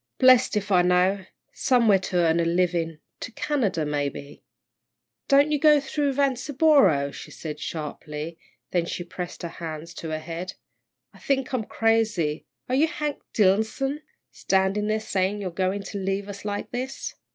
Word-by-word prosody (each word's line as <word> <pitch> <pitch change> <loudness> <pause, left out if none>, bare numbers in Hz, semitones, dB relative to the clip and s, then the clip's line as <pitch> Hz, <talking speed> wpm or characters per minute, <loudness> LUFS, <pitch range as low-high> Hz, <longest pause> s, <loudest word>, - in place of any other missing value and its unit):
"Blest 255 -3 +5
if 205 0 -3
I 180 -2 +6
know 180 +2 +2 0.3
somewhere 230 -6 +3
to 185 - -5
earn 170 -1 +3
a - - +3
living, 170 -1 0 0.2
to - - -6
Canada, 220 - 0
maybe." 145 -1 -4 0.8
"Don't 285 +2 +5
you 295 - +1
go 300 0 +6
through 285 0 -1
Vanceboro," 265 - +3
she - - -10
said, 150 -2 -7
sharply, 155 +1 -6 0.3
then 170 -2 +1
she 175 - -4
pressed 175 +1 -7
her - - -2
hands 165 -1 -7
to 165 - -6
her 155 - -2
head. 170 +3 -6 0.6
"I - - -17
think 270 -2 -1
I'm 235 -4 -1
crazy 215 -11 0 0.2
are 250 - -3
you 290 +5 +4
Hank 300 -3 -3
Dillson, 220 +8 +1 0.3
standin' 195 +2 +1
there 215 0 +1
sayin' 195 -1 -1
you're 190 -3 -4
goin' 190 +3 -1
to 200 +1 -5
leave 195 +1 -2
us 200 0 -8
like 205 -1 -3
this?" 255 +2 -4
195 Hz, 160 wpm, -25 LUFS, 170-255 Hz, 0.8 s, I